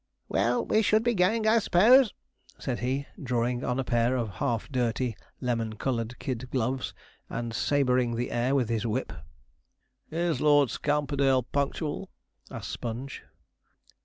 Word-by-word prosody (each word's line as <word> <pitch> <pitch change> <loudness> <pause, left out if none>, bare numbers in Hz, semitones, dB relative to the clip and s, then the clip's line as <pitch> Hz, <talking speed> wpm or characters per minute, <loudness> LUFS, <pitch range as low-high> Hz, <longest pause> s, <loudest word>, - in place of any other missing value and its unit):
'Well, 120 +1 +1
we 220 - +3
should 215 +1 +3
be 240 0 +2
going, 215 +3 +2
I 220 +1 +5
suppose,' 225 +6 +5 0.5
said 125 -3 -3
he, 130 +3 -1 0.2
drawing 120 -1 -1
on 125 +1 -1
a - - +1
pair 120 0 +1
of 115 -4 -2
half 115 -2 0
dirty, 120 -2 0 0.2
lemon 115 -3 -1
coloured 120 0 -2
kid 130 -1 -4
gloves, 130 +1 -2 0.3
and 115 0 -4
sabreing 125 -2 +1
the 120 +2 -2
air 125 +3 +1
with 130 -4 +2
his 115 -2 0
whip. 120 +4 -2 1.0
'Is 170 0 -1
Lord 145 -3 +5
Scamperdale 140 -3 +1
punctual?' 145 +5 -2 0.4
asked - - -6
Sponge. 120 +4 -5
130 Hz, 140 wpm, -28 LUFS, 120-145 Hz, 1.0 s, I